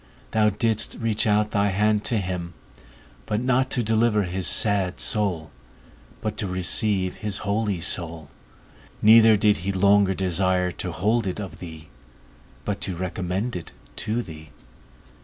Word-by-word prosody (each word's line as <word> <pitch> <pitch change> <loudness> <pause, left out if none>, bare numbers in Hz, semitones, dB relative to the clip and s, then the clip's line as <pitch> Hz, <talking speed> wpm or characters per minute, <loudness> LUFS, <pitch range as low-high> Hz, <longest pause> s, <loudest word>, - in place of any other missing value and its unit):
_ - - -29
thou 110 -1 +3
didst 110 +1 0
reach 115 -2 0
out 105 0 +2
thy 100 0 +1
hand 105 +2 +1
to 115 - 0
him; 90 -3 -4 0.7
but 105 - -1
not 130 +1 +1
to 125 -4 -1
deliver 110 -1 +2
his 90 0 -2
sad 100 -4 +1
soul, 90 -9 +1 0.7
but 110 -1 -3
to 105 - -2
receive 95 +1 -1
his 105 -3 -3
holy 100 -2 -1
soul: 80 -2 -2 0.7
neither 110 0 +7
did 105 0 +3
he 95 +4 -3
longer 100 0 +3
desire 90 0 0
to 90 +1 -4
hold 105 +6 0
it 95 - -4
of 90 -6 -7
thee, 80 -3 -10 0.8
but 100 -1 -3
to 95 - -2
recommend 95 +5 -3
it 85 - -7 0.2
to 115 +3 -2
thee. 80 -5 -11
100 Hz, 150 wpm, -24 LUFS, 90-110 Hz, 0.8 s, neither